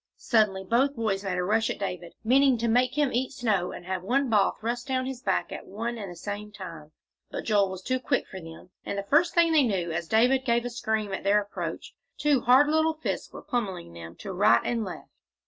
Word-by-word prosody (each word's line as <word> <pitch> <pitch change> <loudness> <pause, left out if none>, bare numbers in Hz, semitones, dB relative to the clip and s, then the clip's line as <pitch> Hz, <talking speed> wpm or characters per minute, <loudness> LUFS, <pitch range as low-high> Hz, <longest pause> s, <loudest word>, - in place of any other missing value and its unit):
Suddenly 210 -5 +2
both 255 +8 +2
boys 210 -4 -1
made 185 -2 -2
a 180 - 0
rush 220 +4 +1
at - - -3
David, 180 -3 -5
meaning 265 +2 +4
to 235 +1 -1
make 250 +3 +2
him 290 -3 +2
eat 255 +3 -1
snow 215 -9 0
and 175 - -9
have 185 0 -3
one 255 +6 0
ball 205 -3 +3
thrust 240 +3 -3
down 260 -1 0
his 260 -2 -5
back - - -1
at - - -7
one 230 +4 -4
and 200 -3 -6
the - - -9
same 205 +4 -6
time, 165 -6 -9 0.4
but - - -5
Joel 205 -3 +2
was 190 0 -7
too 255 +4 0
quick - - 0
for 190 - -8
them, 165 +2 -12
and 200 - -4
the 200 - -2
first 305 - +3
thing 340 -1 +5
they 315 -2 +5
knew, 190 -9 0
as 170 +1 -3
David 250 +6 +3
gave 235 -1 +1
a 245 - -3
scream 220 -3 -2
at - - -4
their 200 +2 +4
approach, 205 0 -6 0.2
two 290 -3 +2
hard 260 +4 +6
little 315 +1 +2
fists 315 - -4
were - - -10
pommelling 195 - -3
them 85 0 -10
to 195 - -6
right 205 +4 +4
and 235 -2 0
left. 185 -4 -8
220 Hz, 235 wpm, -27 LUFS, 190-255 Hz, 0.4 s, hard